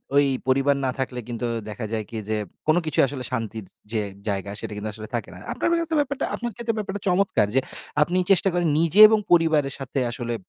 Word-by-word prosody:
ওই 145 Hz, -, +6 dB, 0.2 s
পরিবার 135 Hz, +2 st, +3 dB
না 130 Hz, -, +1 dB
থাকলে 130 Hz, -1 st, -2 dB
কিন্তু 120 Hz, 0 st, -4 dB, 0.2 s
দেখা 105 Hz, +2 st, -5 dB
যায় 110 Hz, -2 st, -2 dB
কি, 115 Hz, -, -6 dB
যে 110 Hz, -, +1 dB, 0.3 s
কোন 155 Hz, -, +5 dB
কিছুই 155 Hz, -3 st, +2 dB
আসলে 130 Hz, -2 st, -5 dB
শান্তির 110 Hz, -4 st, -3 dB, 0.3 s
যে 110 Hz, -2 st, 0 dB, 0.3 s
জায়গা, 100 Hz, 0 st, -2 dB
সেটা 110 Hz, -2 st, -6 dB
কিন্তু 105 Hz, +1 st, -4 dB
আসলে 110 Hz, +1 st, -8 dB
থাকে 115 Hz, -, -3 dB
না। 90 Hz, -, -11 dB, 0.2 s
আপনার -, -, -1 dB
বের 340 Hz, -, +3 dB
কাছে 325 Hz, -1 st, -2 dB
ব্যাপারটা 285 Hz, -1 st, -1 dB
আপনার 240 Hz, 0 st, -4 dB
ক্ষেত্রে 235 Hz, -1 st, -2 dB
ব্যাপারটা 205 Hz, -2 st, -4 dB
চমৎকার। 180 Hz, -, +2 dB
যে 135 Hz, -, +6 dB, 0.4 s
আপনি 175 Hz, +4 st, +2 dB
চেষ্টা 195 Hz, +1 st, +5 dB
করেন 175 Hz, -1 st, +1 dB
নিজে 170 Hz, +4 st, +2 dB
এবং 220 Hz, -, +3 dB
পরিবারের 155 Hz, -5 st, +3 dB
সাথে 135 Hz, +1 st, -3 dB
আসলে 120 Hz, 0 st, -4 dB
135 Hz, 210 wpm, -24 LUFS, 115-180 Hz, 0.4 s, ওই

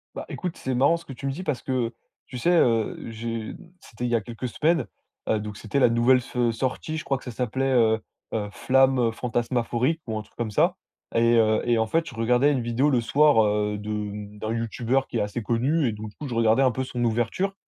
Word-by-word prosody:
Bah, -, -, -5 dB
écoute, 180 Hz, -2 st, -4 dB
c'est 130 Hz, -1 st, -3 dB
marrant 140 Hz, +7 st, +4 dB
ce 165 Hz, -, -14 dB
que 135 Hz, -, -8 dB
tu 130 Hz, -, -8 dB
me 135 Hz, -, 0 dB
dis, 150 Hz, +7 st, -6 dB
parce 150 Hz, -8 st, -2 dB
que 125 Hz, -3 st, -1 dB, 0.4 s
tu 125 Hz, -, -7 dB
sais, 170 Hz, +9 st, +2 dB
heu, 115 Hz, -10 st, +3 dB
j'ai 115 Hz, 0 st, -5 dB, 0.2 s
c'était 120 Hz, -3 st, -7 dB
il 120 Hz, -, -1 dB
y -, -, +3 dB
a 115 Hz, -, +1 dB
quelques 120 Hz, +4 st, -6 dB
semaines, 155 Hz, +4 st, +1 dB, 0.4 s
heu, 110 Hz, -, +2 dB
donc 105 Hz, -1 st, -6 dB
c'était 110 Hz, +6 st, -2 dB
la 125 Hz, -, +5 dB
nouvelle 120 Hz, +3 st, +4 dB
s 125 Hz, 0 st, -7 dB
sortie. 130 Hz, +6 st, -3 dB
Je 155 Hz, -, -5 dB
crois 135 Hz, -, 0 dB
que -, -, -14 dB
ça 125 Hz, -, -6 dB
s'appelait, 130 Hz, +3 st, -1 dB
heu, 110 Hz, -3 st, +4 dB, 0.3 s
heu, 105 Hz, -2 st, -2 dB
«Flamme» 130 Hz, +5 st, +3 dB
heu, 115 Hz, -2 st, +2 dB
«Fantasmaphorique», 120 Hz, +5 st, -1 dB
ou 110 Hz, -1 st, -2 dB
un -, -, -3 dB
truc 105 Hz, -, -19 dB
comme 115 Hz, -2 st, -3 dB
ça -, -, +2 dB, 0.4 s
et 115 Hz, 0 st, +4 dB
heu 110 Hz, -1 st, +3 dB
et 120 Hz, -1 st, +2 dB
en 110 Hz, -, +2 dB
fait, 165 Hz, +9 st, 0 dB
je -, -, -9 dB
regardais 125 Hz, +5 st, +3 dB
une 135 Hz, -3 st, 0 dB
vidéo 120 Hz, +5 st, +1 dB
le 130 Hz, -4 st, +3 dB
soir, 140 Hz, 0 st, +4 dB
heu, 105 Hz, 0 st, 0 dB
de 105 Hz, 0 st, -5 dB
d'un 110 Hz, +1 st, -3 dB
youtubeur 115 Hz, +3 st, 0 dB
qui -, -, -3 dB
est -, -, +1 dB
assez 105 Hz, +3 st, -3 dB
connu 130 Hz, +7 st, +1 dB
et -, -, 0 dB
donc 105 Hz, 0 st, -7 dB
du -, -, -20 dB
coup, 150 Hz, -, -7 dB
je 125 Hz, -, -5 dB
regardais 115 Hz, +3 st, +4 dB
un 130 Hz, -, +4 dB
peu 130 Hz, +3 st, -2 dB
son 125 Hz, -2 st, -3 dB
ouverture 120 Hz, -, 0 dB
120 Hz, 245 wpm, -25 LUFS, 110-135 Hz, 0.4 s, la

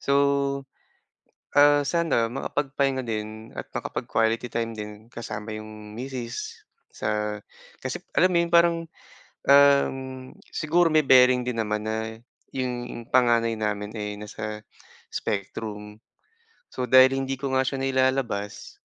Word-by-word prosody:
So, 140 Hz, -, -1 dB, 1.4 s
ah, 145 Hz, 0 st, +7 dB
sana 165 Hz, -9 st, +1 dB
makapagpahinga 135 Hz, +1 st, -1 dB
din 110 Hz, -1 st, -5 dB
at -, -, -7 dB
makapag-quality 115 Hz, +2 st, -1 dB
time 115 Hz, -1 st, -2 dB
din 105 Hz, +1 st, -8 dB
kasama 110 Hz, -2 st, -6 dB
yung 110 Hz, 0 st, -10 dB
misis 125 Hz, -2 st, -5 dB, 0.3 s
sa 105 Hz, 0 st, -2 dB, 0.4 s
kasi -, -, -4 dB, 0.2 s
alam 185 Hz, -, +5 dB
mo 175 Hz, -, +3 dB
yung 170 Hz, -, -7 dB
parang, 170 Hz, 0 st, +6 dB, 0.7 s
um, 140 Hz, -1 st, +6 dB, 0.5 s
siguro 165 Hz, +2 st, +2 dB
may 155 Hz, -1 st, +3 dB
bearing 125 Hz, -1 st, +6 dB
din 120 Hz, -2 st, -2 dB
naman, 105 Hz, -1 st, -2 dB
na 110 Hz, 0 st, -3 dB, 0.4 s
yung 120 Hz, -2 st, -4 dB
panganay 120 Hz, -2 st, +4 dB
namin, 105 Hz, 0 st, -2 dB
eh, 105 Hz, -2 st, -4 dB
nasa 105 Hz, 0 st, -6 dB, 0.5 s
spectrum. 105 Hz, +1 st, -4 dB, 0.7 s
So, 125 Hz, -1 st, -3 dB
dahil 130 Hz, 0 st, +8 dB
hindi 135 Hz, 0 st, -2 dB
ko 135 Hz, 0 st, -3 dB
nga 130 Hz, -, +4 dB
siya 135 Hz, +1 st, -2 dB
nailalabas, 130 Hz, -6 st, -1 dB
120 Hz, 120 wpm, -25 LUFS, 110-135 Hz, 1.4 s, dahil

